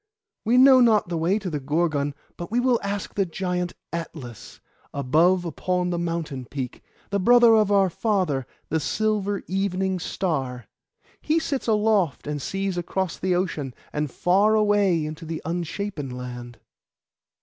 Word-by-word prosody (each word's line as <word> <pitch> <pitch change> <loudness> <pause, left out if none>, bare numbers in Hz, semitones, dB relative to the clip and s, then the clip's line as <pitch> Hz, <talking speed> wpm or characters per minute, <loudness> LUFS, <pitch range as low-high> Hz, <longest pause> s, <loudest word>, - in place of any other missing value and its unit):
We 235 +3 +3
know 260 0 +8
not 220 -6 +4
the 170 - -1
way 175 +5 +2
to 205 -3 -5
the 150 - -2
Gorgon; 145 0 0 0.2
but 175 - -7
we 235 +3 +1
will 245 -2 +3
ask 200 0 -4
the 200 - +1
giant 180 -1 -3 0.2
Atlas, 145 -9 -7 0.4
above 165 +7 +3
upon 180 +1 -1
the 175 - -1
mountain 165 -6 -3
peak, 130 -1 -6 0.3
the 200 - +1
brother 240 +3 +6
of 215 -2 +4
our 195 -1 +5
father, 180 - 0 0.2
the 160 - +1
silver 205 +4 -1
Evening 190 0 -1
Star. 135 -10 -2 0.6
He 310 +2 +1
sits 280 -6 -2
aloft 210 - +2
and 150 -1 -3
sees 195 +2 -2
across 185 0 -3
the 185 -1 +1
ocean, 155 -8 -2 0.2
and 150 0 -1
far 195 - +3
away 205 -6 +3
into 155 +2 -7
the 160 0 -4
Unshapen 170 -2 -3
Land. 125 -1 -7
180 Hz, 150 wpm, -24 LUFS, 150-205 Hz, 0.6 s, know